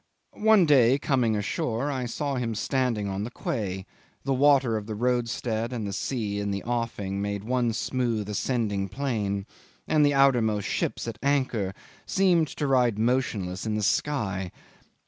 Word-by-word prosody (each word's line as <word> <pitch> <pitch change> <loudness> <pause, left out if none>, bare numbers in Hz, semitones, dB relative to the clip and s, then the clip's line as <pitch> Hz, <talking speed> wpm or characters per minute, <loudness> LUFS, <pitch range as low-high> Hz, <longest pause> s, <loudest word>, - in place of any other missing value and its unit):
One 215 -4 +5
day, 135 -4 +5
coming 130 -7 +1
ashore, 115 +6 -1
I 130 -3 -2
saw 140 +3 -2
him 120 -4 -2
standing 120 -3 0
on 100 +1 -3
the 115 - -4
quay; 95 -6 -3 0.4
the 135 - 0
water 135 -3 +4
of 105 -1 -4
the 110 - -4
roadstead 120 -1 -1
and 115 -4 -3
the 100 - -4
sea 105 -2 -2
in 100 0 -2
the 100 -1 -3
offing 115 -5 -2
made 100 0 -3
one 120 0 +1
smooth 115 -2 -1
ascending 105 -2 -1
plane, 105 -7 -2 0.4
and 155 -1 +3
the 145 -1 +3
outermost 120 -7 +3
ships - - -2
at 115 -2 -5
anchor 130 -9 0 0.3
seemed 180 -4 +3
to 145 - -4
ride 125 -5 +3
motionless 110 -5 -1
in 110 - 0
the 105 - -1
sky. 100 -9 0
115 Hz, 160 wpm, -26 LUFS, 105-135 Hz, 0.4 s, One